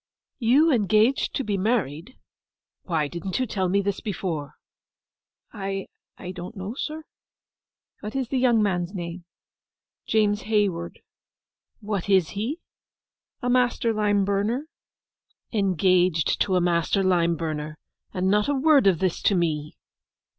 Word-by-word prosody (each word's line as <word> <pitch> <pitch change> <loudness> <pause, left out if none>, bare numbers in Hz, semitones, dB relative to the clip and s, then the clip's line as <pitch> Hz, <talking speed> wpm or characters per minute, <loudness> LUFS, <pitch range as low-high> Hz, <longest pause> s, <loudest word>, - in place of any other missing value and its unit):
—you 275 +7 +4
engaged 220 +2 +2
to 270 - -1
be 205 -4 -1
married?—Why 175 - -4
didn't 170 +4 -4
you 255 - +1
tell 190 -5 -1
me 200 +2 +2
this 200 0 -2
before?' 170 -8 -4 1.0
'I—I 195 -2 -7
don't 180 +4 -8
know, 190 +4 -5
sir.' 310 +4 -5 1.0
'What 215 +3 -7
is 260 -3 -2
the 265 - 0
young 240 -4 +4
man's 180 -1 -1
name?' 175 0 -6 0.8
'James 210 -1 +2
Hayward.' 195 -6 0 0.8
'What 205 -2 -3
is 190 -5 +4
he?' 240 - -4 0.8
'A 245 - +1
master 245 -2 +2
lime 205 -2 +2
burner.' 205 +8 0 0.9
'Engaged 185 -5 +2
to 190 - +2
a 180 - +3
master 175 +3 +1
lime 170 -2 +2
burner, 155 -1 -4 0.3
and 185 -1 -1
not 210 +5 +2
a 285 - +2
word 280 -5 +4
of 185 -3 +4
this 185 0 -1
to 200 - +3
me! 155 -4 -1
195 Hz, 130 wpm, -25 LUFS, 175-225 Hz, 1.0 s, you